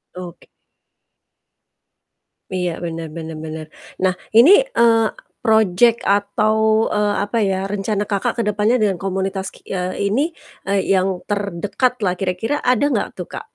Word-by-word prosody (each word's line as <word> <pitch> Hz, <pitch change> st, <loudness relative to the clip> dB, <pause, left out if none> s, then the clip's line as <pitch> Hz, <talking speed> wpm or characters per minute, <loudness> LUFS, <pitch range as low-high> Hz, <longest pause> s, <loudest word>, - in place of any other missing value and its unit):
Oke. 180 Hz, -1 st, -10 dB, 2.1 s
Iya, 180 Hz, -1 st, 0 dB, 0.2 s
bener 165 Hz, -1 st, -5 dB
bener 160 Hz, -1 st, -6 dB
bener. 155 Hz, 0 st, -6 dB, 0.4 s
Nah, 185 Hz, -1 st, +3 dB, 0.2 s
ini, 255 Hz, +10 st, +8 dB, 0.3 s
eee, 225 Hz, -1 st, +5 dB, 0.4 s
project 220 Hz, 0 st, +4 dB
atau, 205 Hz, +2 st, +2 dB, 0.4 s
eee, 210 Hz, 0 st, +1 dB
apa 205 Hz, +3 st, -3 dB
ya, 195 Hz, -1 st, 0 dB
rencana 205 Hz, 0 st, -1 dB
Kakak 200 Hz, -2 st, -1 dB
ke -, -, +2 dB
depannya 210 Hz, +3 st, +2 dB
dengan 200 Hz, -3 st, +2 dB
komunitas 190 Hz, 0 st, -2 dB
ki -, -, -18 dB
eee, 185 Hz, +1 st, -2 dB
ini, 215 Hz, +7 st, +1 dB, 0.5 s
eee, 200 Hz, -1 st, +2 dB
yang 190 Hz, 0 st, +2 dB, 0.2 s
terdekat 205 Hz, +4 st, -1 dB
lah 180 Hz, -2 st, +2 dB
kira-kira, 195 Hz, +8 st, -1 dB
ada 250 Hz, +3 st, +2 dB
gak 205 Hz, -, 0 dB
tuh, 180 Hz, -, -5 dB
Kak? -, -, -6 dB
200 Hz, 135 wpm, -19 LUFS, 185-215 Hz, 2.1 s, ini